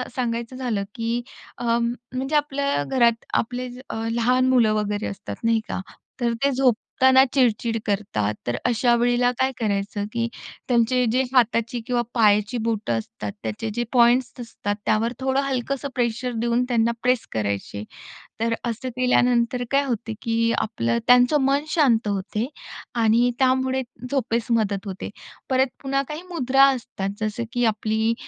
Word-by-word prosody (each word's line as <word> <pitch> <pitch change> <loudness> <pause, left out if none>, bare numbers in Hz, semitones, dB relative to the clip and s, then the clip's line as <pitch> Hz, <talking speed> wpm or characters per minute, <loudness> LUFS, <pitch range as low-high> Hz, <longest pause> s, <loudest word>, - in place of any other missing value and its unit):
सांगायचं 235 0 -2
झालं, 240 -6 -2
की 230 +1 -1 0.4
अ, - - -7
म्हणजे 240 +4 -1
आपल्या 280 - +1
घरात 235 - +2
आपले 250 +2 -1 0.2
अ, - - -4 0.2
लहान 250 +2 +2
मुलं 235 -4 +4
वगैरे 210 0 -1
असतात, 200 - -6
नाही 230 -1 +3
का. - - -3 0.4
तर 235 -1 +1
ते 280 - +4
झोपताना 260 +1 +4
चिड-चिड 235 -3 +2
करतात, 195 - -1
तर 120 - 0
अशा 240 0 +3
वेळेला 245 +1 +2
काय 260 0 +2
करायचं, 205 -1 -1
की 230 0 0 0.4
त्यांचे 245 +1 +3
जे 255 +2 +2
हाताची 235 -1 +2
किंवा 245 -1 +1
पायाची 210 0 +3
बोटं 210 - 0
असतात. 105 -1 -7
त्याचे 110 - -3
जे 240 +1 -1
पॉइंट्स 245 +1 +4
असतात 205 -3 -4
त्यावर 230 +3 +1
थोडं 265 +1 +1
हलकंसं 275 +1 -2
प्रेशर 245 +1 -1
देऊन 235 +1 +1
त्यांना 235 -1 +2
प्रेस 250 -1 +1
करायचे. 100 -1 -3 0.6
तर 230 +1 +1 0.2
असं 235 +3 -4
केल्यानंतर 245 -1 +2
काय 280 +1 +3
होते, 230 -3 -3
की 230 0 +1
आपलं 115 - 0
त्यांचं 250 +4 +5
मन 275 +2 +2
शांत 250 -10 +3
होते 205 +4 -2 0.6
आणि 235 +3 +4
त्यामुळे 260 0 +2 0.3
झोपेस 235 -4 0
मदत 210 -3 +1
होते. 190 -1 -5 0.4
परत 260 +1 +3 0.2
पुन्हा 275 0 +1
काही 305 +3 -5
मुद्रा 270 -5 +4
असतात. 210 -5 -5
जसं 215 +2 -2
की 245 -1 +1
आपली 220 +1 +1
235 Hz, 145 wpm, -23 LUFS, 220-255 Hz, 0.6 s, त्यांचं